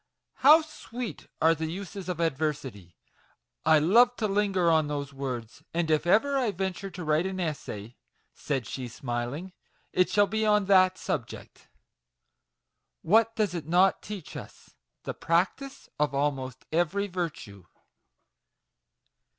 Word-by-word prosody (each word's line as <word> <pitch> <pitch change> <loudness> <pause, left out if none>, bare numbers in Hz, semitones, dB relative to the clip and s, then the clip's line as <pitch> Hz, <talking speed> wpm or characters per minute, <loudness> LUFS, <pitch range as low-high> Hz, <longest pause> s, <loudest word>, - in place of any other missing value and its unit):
How 305 +4 +7
sweet 250 -6 -7
are 160 +1 +5
the 160 0 -3
uses 190 +2 -6
of 175 -2 -3
adversity! 135 - -3 0.7
I 160 -1 +7
love 235 +11 +5
to 220 - -1
linger 195 -3 +1
on 160 -2 +3
those 140 -1 -4
words; 125 -5 -5
and 170 -2 0
if 155 +2 +1
ever 275 +9 +3
I 245 -4 +1
venture 190 0 -3
to 180 -1 -8
write 155 +3 +1
an 190 0 -4
essay," 125 - -5 0.4
said 135 -5 -3
she, 130 -2 -5
smiling, 120 +9 -5 0.2
" - - -41
it 185 0 +3
shall 205 0 +4
be 220 +2 -1
on 210 -2 +3
that 185 -1 +5
subject. - - -5 1.4
What 225 +5 +3
does 215 -5 0
it 165 -4 -5
not 180 +3 +3
teach 205 -6 -8
us? - - -11 0.3
the - - -4
practice 185 - -1
of 145 -2 +1
almost 135 -3 -2
every 175 +5 +1
virtue." 165 - -5
175 Hz, 140 wpm, -28 LUFS, 145-200 Hz, 1.4 s, How